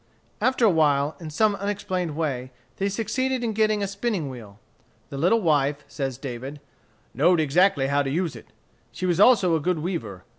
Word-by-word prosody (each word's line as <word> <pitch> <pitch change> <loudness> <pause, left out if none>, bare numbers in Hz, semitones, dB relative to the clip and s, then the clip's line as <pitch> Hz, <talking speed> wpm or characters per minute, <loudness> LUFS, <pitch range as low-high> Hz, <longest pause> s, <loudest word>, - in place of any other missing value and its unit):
After 255 -2 +2
a - - +6
while, 150 -2 +2
in 165 -3 -7
some 210 +7 +2
unexplained 190 -5 -3
way, 135 -6 -2 0.3
they 195 +1 0
succeeded 245 +5 -1
in 225 -2 -1
getting 215 -1 +1
a - - -1
spinning 200 - -3
wheel. 105 -5 -11 0.5
The 140 - -6
little 190 +9 +3
wife, 145 -4 +1
says 135 -4 -4
David, 135 +2 -7 0.5
"knowed 170 +4 +3
exactly 155 0 +3
how 140 +1 +1
to 135 - -2
use 165 +2 -1
it. - - -12 0.4
She 185 - -5
was 175 -1 +1
also 200 -7 +5
a - - +1
good 180 +3 0
weaver. 150 - -4
165 Hz, 180 wpm, -24 LUFS, 140-200 Hz, 0.5 s, a